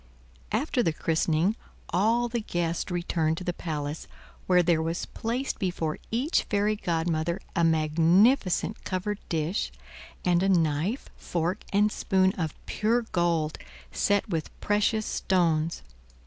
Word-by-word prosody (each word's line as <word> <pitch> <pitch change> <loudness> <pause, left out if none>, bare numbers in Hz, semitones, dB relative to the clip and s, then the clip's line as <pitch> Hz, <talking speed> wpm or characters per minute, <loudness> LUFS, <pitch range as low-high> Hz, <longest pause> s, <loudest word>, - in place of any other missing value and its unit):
After 250 +4 +1
the 165 -7 +1
christening 165 +5 +1 0.3
all 225 +7 +2
the 240 0 -2
guests 175 -5 -2
returned 170 -2 0
to 185 - -5
the 175 - -1
palace, 150 -2 -4 0.4
where 180 -1 +5
there 165 -2 +3
was 165 +2 -2
placed 245 +4 -3
before 170 -4 -2
each 255 +9 +1
fairy 210 +1 +1
godmother 170 -1 -1 0.2
a 170 - +2
magnificent 170 - +3
covered 200 +2 -2
dish, 165 +4 -1 0.5
and 175 -1 +3
a 195 - +2
knife, 170 - +1
fork, 175 +3 -2
and 210 +1 +3
spoon 190 -1 +2
of 160 -4 -3
pure 230 +3 +1
gold, 170 -3 +1 0.3
set 205 +1 +1
with 165 -6 -2
precious 210 +1 +1
stones. 165 -3 +1
175 Hz, 130 wpm, -27 LUFS, 165-210 Hz, 0.5 s, where